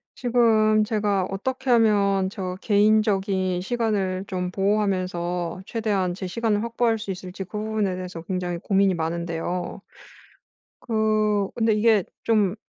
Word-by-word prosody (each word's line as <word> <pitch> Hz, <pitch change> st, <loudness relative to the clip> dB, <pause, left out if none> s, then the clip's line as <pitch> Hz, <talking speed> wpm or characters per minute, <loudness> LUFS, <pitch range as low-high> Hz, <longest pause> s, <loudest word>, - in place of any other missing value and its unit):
지금 225 Hz, -3 st, +3 dB
제가 205 Hz, -3 st, 0 dB
어떻게 260 Hz, +7 st, -3 dB
하면 200 Hz, -5 st, +3 dB
저 185 Hz, -3 st, -5 dB
개인적인 200 Hz, -4 st, +2 dB
시간을 195 Hz, -4 st, -1 dB
좀 180 Hz, -2 st, -3 dB
보호하면서 185 Hz, -3 st, -1 dB
최대한 205 Hz, -6 st, -1 dB
제 185 Hz, -, -5 dB
시간을 210 Hz, +2 st, 0 dB
확보할 230 Hz, -1 st, +1 dB
수 210 Hz, -2 st, -6 dB
있을지 185 Hz, +1 st, -7 dB
그 190 Hz, -, -9 dB
부분에 215 Hz, -3 st, -1 dB
대해서 180 Hz, -2 st, -6 dB
굉장히 180 Hz, -1 st, -3 dB
고민이 195 Hz, +1 st, +2 dB
많은데요. 170 Hz, +1 st, -3 dB, 1.0 s
그 215 Hz, -3 st, +1 dB
근데 225 Hz, -2 st, +2 dB
이게 215 Hz, -2 st, +3 dB, 0.2 s
좀 210 Hz, -4 st, +2 dB
200 Hz, 285 characters per minute, -24 LUFS, 185-220 Hz, 1.0 s, 지금